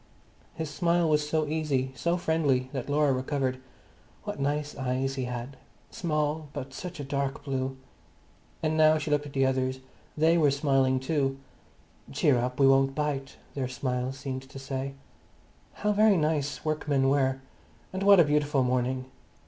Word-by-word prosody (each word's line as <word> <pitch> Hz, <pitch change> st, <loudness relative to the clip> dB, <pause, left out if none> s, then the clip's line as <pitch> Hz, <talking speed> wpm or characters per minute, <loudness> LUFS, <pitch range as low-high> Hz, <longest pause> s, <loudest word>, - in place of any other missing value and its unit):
His 160 Hz, -2 st, -4 dB
smile 170 Hz, +1 st, +2 dB
was 150 Hz, -1 st, +1 dB
so 155 Hz, 0 st, +1 dB
easy, 145 Hz, -4 st, -1 dB
so 170 Hz, +6 st, 0 dB
friendly 145 Hz, -7 st, +1 dB
that 135 Hz, -1 st, -4 dB
Laura 145 Hz, -1 st, +3 dB
recovered. 130 Hz, 0 st, -1 dB, 0.6 s
What -, -, -5 dB
nice 145 Hz, +1 st, -1 dB
eyes 130 Hz, 0 st, -1 dB
he 130 Hz, -2 st, -3 dB
had, 125 Hz, +2 st, -6 dB, 0.3 s
small, 150 Hz, -2 st, -1 dB
but 135 Hz, -2 st, -6 dB
such 180 Hz, +2 st, -7 dB
a -, -, -3 dB
dark 140 Hz, 0 st, -2 dB
blue! 135 Hz, -1 st, -2 dB, 0.9 s
And 155 Hz, 0 st, +1 dB
now 155 Hz, 0 st, +5 dB
she 150 Hz, 0 st, -3 dB
looked 145 Hz, 0 st, +1 dB
at 140 Hz, -, -11 dB
the 135 Hz, -1 st, +2 dB
others, 130 Hz, 0 st, 0 dB, 0.4 s
they 165 Hz, +2 st, +4 dB
were 150 Hz, -3 st, +5 dB
smiling 135 Hz, -2 st, +2 dB
too. 135 Hz, 0 st, 0 dB, 0.7 s
"Cheer 130 Hz, -4 st, +3 dB
up, 125 Hz, +2 st, -2 dB
we 135 Hz, -, +6 dB
won't 135 Hz, 0 st, +4 dB
bite," 140 Hz, -2 st, -2 dB, 0.2 s
their 135 Hz, -2 st, -2 dB
smile 125 Hz, 0 st, -2 dB
seemed 135 Hz, -1 st, -5 dB
to -, -, -10 dB
say. 135 Hz, 0 st, -4 dB, 0.8 s
How 210 Hz, -, 0 dB
very 210 Hz, -1 st, +5 dB
nice 150 Hz, -2 st, -1 dB
workmen 150 Hz, -3 st, +1 dB
were! 135 Hz, -1 st, +2 dB, 0.5 s
And 190 Hz, -, -3 dB
what 200 Hz, -1 st, +7 dB
a -, -, +9 dB
beautiful 145 Hz, -2 st, +2 dB
morning! 130 Hz, +1 st, 0 dB
140 Hz, 160 wpm, -28 LUFS, 130-155 Hz, 0.9 s, a